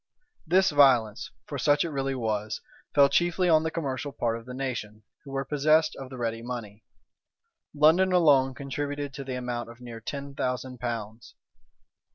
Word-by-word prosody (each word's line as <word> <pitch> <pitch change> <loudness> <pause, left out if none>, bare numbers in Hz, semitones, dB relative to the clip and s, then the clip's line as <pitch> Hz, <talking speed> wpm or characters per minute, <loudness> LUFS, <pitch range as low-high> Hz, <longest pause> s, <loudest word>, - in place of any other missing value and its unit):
This 185 +2 +4
violence 130 -7 +4 0.2
(for - - -5
such 145 +2 +3
it 165 - -4
really 135 -1 -2
was) 110 -3 -2 0.4
fell 140 -1 +7
chiefly 175 +4 +1
on 160 -1 +5
the 160 - -1
commercial 145 -3 -3
part 115 -4 -1
of 115 +1 -9
the 125 - -7
nation, 110 -5 -4 0.2
who 140 - -12
were 135 0 -2
possessed 155 +2 +2
of 135 -1 -8
the 130 - -8
ready 115 -1 -2
money. 115 -4 -7 0.9
London 160 +6 +5
alone 140 -7 +4
contributed 145 +1 -4
to 140 - -6
the 130 -1 -5
amount 125 -1 -4
of 120 +1 -13
near 120 -2 -9
ten 140 +3 -6
thousand 125 -1 -3
pounds. 115 -2 -5
135 Hz, 170 wpm, -27 LUFS, 120-145 Hz, 0.9 s, fell